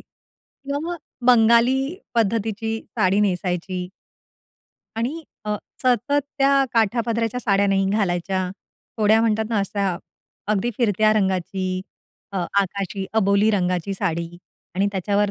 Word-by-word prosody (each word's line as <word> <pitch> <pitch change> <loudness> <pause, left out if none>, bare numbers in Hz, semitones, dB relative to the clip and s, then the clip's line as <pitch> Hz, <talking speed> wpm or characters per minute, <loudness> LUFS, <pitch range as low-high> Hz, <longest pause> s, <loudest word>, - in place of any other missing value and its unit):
किंवा 280 0 -9
मग 350 - -3 0.3
बंगाली 235 +1 +5 0.4
पद्धतीची 225 0 0 0.2
साडी 190 +2 +3
नेसायची. 180 -2 -1 1.1
आणि 270 +9 -2 0.2
अ, 210 0 -1 0.3
सतत 255 +4 +2 0.2
त्या 275 0 +4
काठापदराच्या 230 +1 +1
साड्या 200 -3 +2
नाही 195 0 +2
घालायच्या, 185 -2 0 0.5
थोड्या 220 0 +4
म्हणतात 220 -1 +1
ना 220 - +1
अशा 200 -2 -1 0.6
अगदी 215 +4 0
फिरत्या 215 -2 +3
रंगाची 185 -2 0 0.5
अ, 195 - -4 0.2
आकाशी 195 0 -3
अबोली 205 0 +3
रंगाची 185 -2 0
साडी 170 -4 -2 0.5
आणि 195 +2 +2
त्याच्यावर 200 +2 +1
205 Hz, 110 wpm, -22 LUFS, 190-230 Hz, 1.1 s, बंगाली